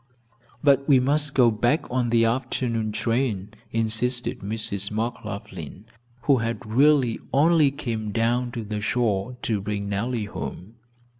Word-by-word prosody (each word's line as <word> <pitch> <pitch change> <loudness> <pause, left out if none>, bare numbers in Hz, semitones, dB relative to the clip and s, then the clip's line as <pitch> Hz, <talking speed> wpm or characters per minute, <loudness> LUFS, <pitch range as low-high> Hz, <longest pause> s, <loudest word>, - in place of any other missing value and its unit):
"But 140 -1 +4
we 135 -2 +7
must 145 +2 0
go 120 -3 +6
back 120 +8 +1
on 125 -1 +1
the 115 0 +4
afternoon 115 -2 -1
train," 115 -3 -1 0.2
insisted 115 +2 -1
Mrs. 100 -1 -3
McLaughlin, 105 -5 -5 0.4
who 140 -2 +4
had 115 -2 -3
really 130 +1 +3
only 155 +1 +5
come 115 -7 -4
down 120 +2 +1
to 115 -3 -4
the 105 0 -4
shore 110 +1 0
to 105 -3 0
bring 100 0 -3
Nellie 110 +2 -1
home. 105 +1 -7
115 Hz, 135 wpm, -24 LUFS, 105-125 Hz, 0.4 s, we